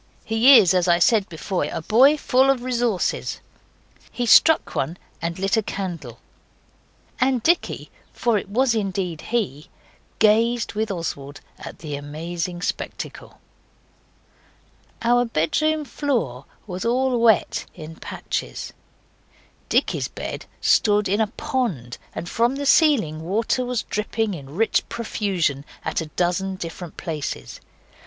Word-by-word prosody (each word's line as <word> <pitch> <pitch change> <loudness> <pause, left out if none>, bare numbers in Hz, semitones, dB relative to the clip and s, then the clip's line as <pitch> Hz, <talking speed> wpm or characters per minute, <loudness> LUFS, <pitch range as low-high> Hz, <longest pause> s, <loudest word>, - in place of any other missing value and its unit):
He 235 +5 +7
is, 190 -5 +5
as 180 -1 +2
I 170 -1 +5
said 200 +3 +3
before, 175 +3 -2
a 165 - -4
boy 265 - +5
full 265 -1 +3
of 265 -3 +2
resources. 240 -6 -1 0.7
He 245 - -2
struck 320 +7 +5
one 160 +6 -2 0.2
and 170 0 -3
lit 195 +3 +1
a - - +3
candle, 170 - -5 1.0
and 255 -2 +2
Dicky, 345 +5 0 0.2
for 235 -2 0
it 200 - -2
was 245 +3 +2
indeed 190 -6 -2
he, 195 - -2 0.5
gazed 225 +2 +3
with 220 +1 -1
Oswald 145 -6 -5 0.2
at - - -9
the 150 -3 -5
amazing 170 +5 -5
spectacle. - - -5 1.6
Our 245 +1 +4
bedroom 300 - 0
floor 225 - -2 0.2
was 185 -3 -5
all 250 +1 +1
wet 225 -5 +3
in 160 -1 -9
patches. - - -5 1.0
Dicky's - - +1
bed - - -7
stood 210 -1 +3
in 205 +4 +1
a 220 - +2
pond, 195 - -3 0.2
and 175 - -5
from 235 +7 +1
the 285 +1 -3
ceiling 255 - +4
water 220 +8 0
was 250 -2 -2
dripping 215 0 -2
in 140 -3 -9
rich 225 +4 +2
profusion 190 - -1 0.2
at - - -1
a 160 - -5
dozen 180 +4 -1
different 170 -1 -7
places. 155 -5 -5
205 Hz, 130 wpm, -23 LUFS, 170-240 Hz, 1.6 s, He